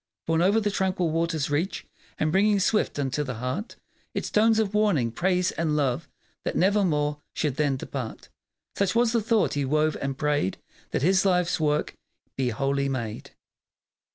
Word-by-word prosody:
Borne 165 0 +1
o'er 200 +5 +4
the 210 -1 0
tranquil 185 -4 0
waters' 165 -3 -1
reach 160 +7 -1 0.3
And 155 - 0
bringing 205 +3 +3
swift 210 -2 +1
unto 140 +1 -1
the 125 -4 -5
heart 130 - -4 0.4
Its - - -3
tones 220 +1 +4
of 215 -2 0
warning, 195 - +2
praise, 180 +5 +1
and 160 -2 -1
love, 135 -5 0 0.3
That - - -2
nevermore 160 -7 +2
should 145 -4 -1
then 145 -3 +1
depart. 130 -3 -6 0.5
Such 200 +1 0
was 235 -1 +3
the 230 -1 +2
thought 210 - +2
he 145 - 0
wove, 155 +3 +1
and 135 -1 -2
prayed 145 -10 0 0.3
That - - -2
his 190 +3 +4
life's 180 -2 +2
work 150 -1 0 0.4
be 130 -2 0
holy 140 +3 0
made. 115 -5 -5
155 Hz, 165 wpm, -26 LUFS, 140-195 Hz, 0.5 s, o'er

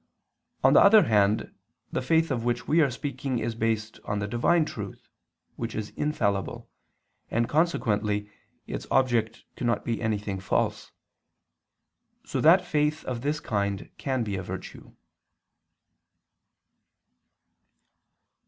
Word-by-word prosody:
On - - +6
the - - +8
other 210 0 +8
hand, 105 -3 +2 0.4
the - - -1
faith 160 +4 +2
of 120 -3 -1
which 120 0 -1
we 160 +2 +4
are 145 - +4
speaking 135 0 -3
is 115 0 -2
based 110 -1 -2
on 105 - -2
the 100 0 -2
Divine 150 +9 +2
Truth, 105 -11 -7 0.5
which 115 -1 -4
is 105 -1 -4
infallible, 100 -10 -1 0.6
and 115 +1 +1
consequently 105 -10 +1 0.4
its - - -6
object 120 -4 +1
cannot 120 -3 -1
be 115 -1 -2
anything 105 -3 -2
false; 95 - -1 1.3
so - - -2
that 180 +4 +6
faith 150 -1 0
of 125 -2 -3
this 145 +3 -1
kind 100 -5 -2
can 130 -3 -1
be 105 -3 -3
a 95 - -3
virtue. 95 +1 -8
115 Hz, 125 wpm, -27 LUFS, 105-145 Hz, 1.3 s, the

